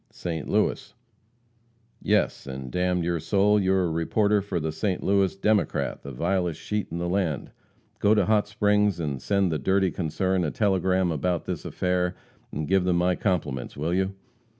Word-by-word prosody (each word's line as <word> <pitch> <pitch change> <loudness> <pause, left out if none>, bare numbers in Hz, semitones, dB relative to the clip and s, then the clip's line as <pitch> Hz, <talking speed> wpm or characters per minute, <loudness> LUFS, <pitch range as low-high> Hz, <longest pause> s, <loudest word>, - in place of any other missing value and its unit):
"St. 80 -5 -5
Louis." - - 0 1.1
"Yes, - - +1
and 65 -1 -6
d 90 - -2
n 90 -1 +1
your 85 0 0
soul, 100 +5 +3
you 95 -1 +1
are 95 -1 +2
a 85 - 0
reporter 100 +6 +1
for 95 -3 -3
the 80 0 -2
St. 95 +4 -2
Louis 100 -1 +2
Democrat, 105 +2 0
the 70 - -8
vilest 90 +4 -1
sheet 105 -1 -3
in 85 - -5
the 85 0 -2
land. 85 -6 -1 0.5
Go 105 +2 +4
to 105 -3 +3
Hot 105 0 +2
Springs 105 -2 +2
and 70 -5 -3
send 100 0 +1
the 80 - -1
dirty 95 +4 +2
concern 95 +2 -1
a 80 - 0
telegram 95 -2 +1
about 85 +3 -1
this - - -4
affair, 90 0 -1 0.4
and 75 +1 -3
give 95 -1 +3
them 90 -1 +1
my 90 +1 +2
compliments, 80 - -2
will 80 +4 -1
you?" 95 +1 0
90 Hz, 180 wpm, -26 LUFS, 80-100 Hz, 1.1 s, Go